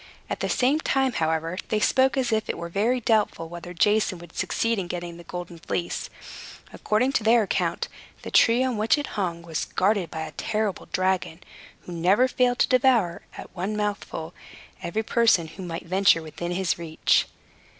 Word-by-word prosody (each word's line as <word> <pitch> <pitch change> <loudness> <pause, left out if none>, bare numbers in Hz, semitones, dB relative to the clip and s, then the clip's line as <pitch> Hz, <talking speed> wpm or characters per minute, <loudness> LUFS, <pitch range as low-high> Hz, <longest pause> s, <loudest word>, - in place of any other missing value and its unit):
At - - -2
the - - -2
same 265 +5 +2
time, 270 -4 +1
however, 160 +2 -1
they 215 - +1
spoke 260 +4 +3
as 250 -3 +1
if 220 0 0
it - - -2
were 170 - -5
very 220 +8 +1
doubtful 210 -8 +1
whether 175 +1 -8
Jason 205 +2 +2
would 170 -1 -14
succeed 230 -2 0
in 180 - -3
getting 175 -1 -5
the 170 - -11
Golden 175 -1 -7
Fleece. 170 +1 -3 0.6
According 230 +5 +1
to 240 - 0
their 225 +1 +5
account, 200 - -1 0.4
the - - -7
tree 235 +2 +5
on 255 -3 -1
which 215 +7 +3
it 290 - -4
hung 175 -5 -2
was 165 -2 -3
guarded 190 -3 +1
by 160 - -5
a 160 - -5
terrible 215 -3 -2
dragon, 185 -3 0 0.4
who - - -11
never 185 +9 +3
failed 250 -1 +1
to - - +3
devour, 250 -9 +3 0.2
at - - -10
one 195 +4 -2
mouthful, 200 -5 -3 0.5
every 215 +6 -2
person 220 -8 +3
who 190 - -10
might 170 -1 -5
venture 180 -2 +3
within 165 +2 -6
his 180 -1 0
reach. 160 -2 +1
195 Hz, 180 wpm, -25 LUFS, 170-230 Hz, 0.6 s, their